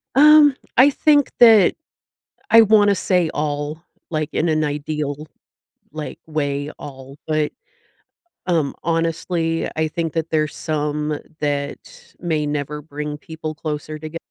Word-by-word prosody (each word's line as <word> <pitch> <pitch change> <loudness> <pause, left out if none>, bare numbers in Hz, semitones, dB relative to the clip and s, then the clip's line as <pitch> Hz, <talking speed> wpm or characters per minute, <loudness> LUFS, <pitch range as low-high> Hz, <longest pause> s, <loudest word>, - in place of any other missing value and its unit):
Um, 295 0 +7 0.2
I 260 +4 +8
think 290 -1 +3
that 220 -6 +7 0.8
I 230 0 +8
wanna 205 -1 +5
say 180 -2 +1
all, 150 +1 -3 0.3
like, 155 -1 -2
in 165 - 0
an 155 0 +1
ideal, 150 0 -3 0.7
like, 155 -1 -6
way 145 -2 -2
all. 135 0 -10
But, 155 -1 0 0.9
um, 165 -6 0
honestly, 165 0 -1
I 160 0 0
think 165 0 -3
that 165 -1 -2
there's 155 -1 0
some 150 -1 -2 0.2
that 150 - -4
may 155 -4 -1
never 145 0 -3
bring 150 0 -6
people 155 0 -7
closer 155 0 -5
toge 155 +2 -8
155 Hz, 125 wpm, -20 LUFS, 150-170 Hz, 0.9 s, I